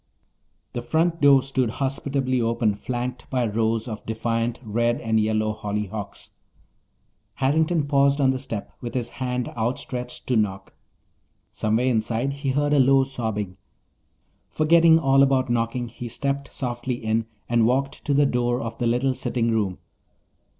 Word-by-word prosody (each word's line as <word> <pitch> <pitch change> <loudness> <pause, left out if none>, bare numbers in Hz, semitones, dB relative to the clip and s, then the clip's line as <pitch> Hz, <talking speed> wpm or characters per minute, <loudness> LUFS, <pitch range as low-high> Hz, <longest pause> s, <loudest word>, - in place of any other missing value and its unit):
The 120 - -3
front 165 +7 0
door 140 -2 +6
stood 130 -3 0
hospitably 135 -2 -1
open, 115 -2 +1
flanked 120 +4 -5
by 125 -2 0
rows 110 +1 0
of 110 -2 -6
defiant 115 +1 -2
red 120 +2 0
and 110 -1 +1
yellow 110 0 +1
hollyhocks. 105 -1 -5 1.0
Harrington 155 +3 +1
paused 140 0 +3
on 135 -2 +4
the 130 - -2
step, 115 -6 -6
with 120 0 -6
his 120 -2 -1
hand 125 -1 -1
outstretched 125 +1 -4
to 125 - 0
knock. 95 -3 -1 0.8
Somewhere 110 +3 0
inside 120 +2 0
he 140 0 -3
heard 145 +2 +1
a 145 - +4
low 135 +1 +5
sobbing. 110 -8 -4 0.9
Forgetting 160 +1 +5
all 135 -3 +4
about 135 -2 +3
knocking, 120 +1 -1
he 120 +1 -8
stepped 140 +3 -3
softly 120 -1 -3
in 110 -1 -1 0.2
and 120 -1 +3
walked 135 +3 -1
to 140 - +1
the 145 +1 +5
door 120 -2 +1
of 115 -2 -6
the 120 - +1
little 125 +3 +1
sitting 115 -2 -1
room. 105 -5 0
125 Hz, 150 wpm, -24 LUFS, 115-135 Hz, 1.0 s, door